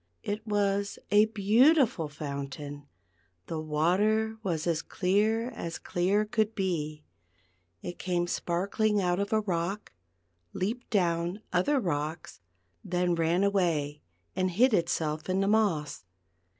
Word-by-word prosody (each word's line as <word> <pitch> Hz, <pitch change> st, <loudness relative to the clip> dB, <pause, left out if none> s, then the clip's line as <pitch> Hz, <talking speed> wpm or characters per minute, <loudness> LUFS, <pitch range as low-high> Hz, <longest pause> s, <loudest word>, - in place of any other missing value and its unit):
It 210 Hz, +2 st, -4 dB
was 200 Hz, -1 st, 0 dB
a 210 Hz, +1 st, +6 dB
beautiful 220 Hz, -, +3 dB
fountain; 145 Hz, -1 st, -6 dB, 0.6 s
the 160 Hz, -, -4 dB
water 195 Hz, +9 st, +1 dB
was 170 Hz, -6 st, -2 dB
as 165 Hz, -3 st, 0 dB
clear 215 Hz, +6 st, +1 dB
as 170 Hz, -8 st, -5 dB
clear 195 Hz, +4 st, +1 dB
could 215 Hz, 0 st, 0 dB
be; 155 Hz, -6 st, -2 dB, 0.8 s
it 175 Hz, -, -6 dB
came 175 Hz, -1 st, 0 dB
sparkling 200 Hz, +5 st, 0 dB
out 180 Hz, -1 st, +1 dB
of 200 Hz, -, -2 dB
a 220 Hz, -1 st, +3 dB
rock, 190 Hz, +1 st, -3 dB, 0.6 s
leaped 225 Hz, +7 st, -3 dB
down 175 Hz, -1 st, 0 dB
other 265 Hz, +11 st, +2 dB
rocks, 160 Hz, -, -3 dB, 0.4 s
then 180 Hz, 0 st, 0 dB
ran 170 Hz, +3 st, +2 dB
away 165 Hz, -7 st, 0 dB, 0.3 s
and 185 Hz, 0 st, +1 dB
hid 235 Hz, +8 st, +3 dB
itself 160 Hz, -3 st, 0 dB
in 185 Hz, +1 st, +1 dB
the 195 Hz, -, +1 dB
moss. 200 Hz, -, +1 dB
185 Hz, 125 wpm, -29 LUFS, 165-210 Hz, 0.8 s, a